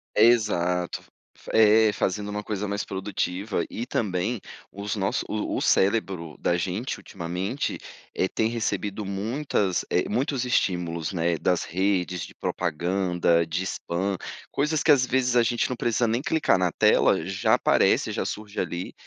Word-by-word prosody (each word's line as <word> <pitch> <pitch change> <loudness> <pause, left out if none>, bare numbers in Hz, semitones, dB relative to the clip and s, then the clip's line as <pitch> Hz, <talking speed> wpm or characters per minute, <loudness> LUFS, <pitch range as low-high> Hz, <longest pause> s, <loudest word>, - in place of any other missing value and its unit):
Exato, 90 -7 +2 0.3
f - - -10
é, 110 0 +6
fazendo 100 +1 -1
uma 105 0 -4
coisa 105 -1 -3
mais 100 +1 -2
produtiva 95 -1 -2
e 120 - -4
também 105 0 -1 0.3
os 100 +2 -4
nossos 100 -2 -1
o 105 -1 -2
o - - -1
cérebro 95 -6 +1
da 85 - +1
gente, 95 +8 -3
ultimamente, 95 +8 -4 0.4
eh, 95 - +1
tem 110 +3 0
recebido 110 -3 -2
muitas 100 -1 -1
eh, 90 - +1
muitos 130 +3 0
estímulos, 90 -8 0
né, 85 -1 0
das 90 +2 +1
redes, 90 -1 -1
de - - -13
propaganda, 85 0 0
de 85 +3 -2
spam, 95 +1 -2 0.3
coisas 150 +1 0
que 160 - +5
às 130 -3 +5
vezes 125 -1 +1
a 120 - +5
gente 115 +1 0
não 125 - -2
precisa 120 0 +1
nem 115 +3 0
clicar 160 -6 +2
na 90 -1 +1
tela, - - +3
já 95 0 +1
aparece, - - +3
já - - -2
surge 105 0 -5
ali. 90 0 -3
100 Hz, 155 wpm, -25 LUFS, 90-115 Hz, 0.4 s, é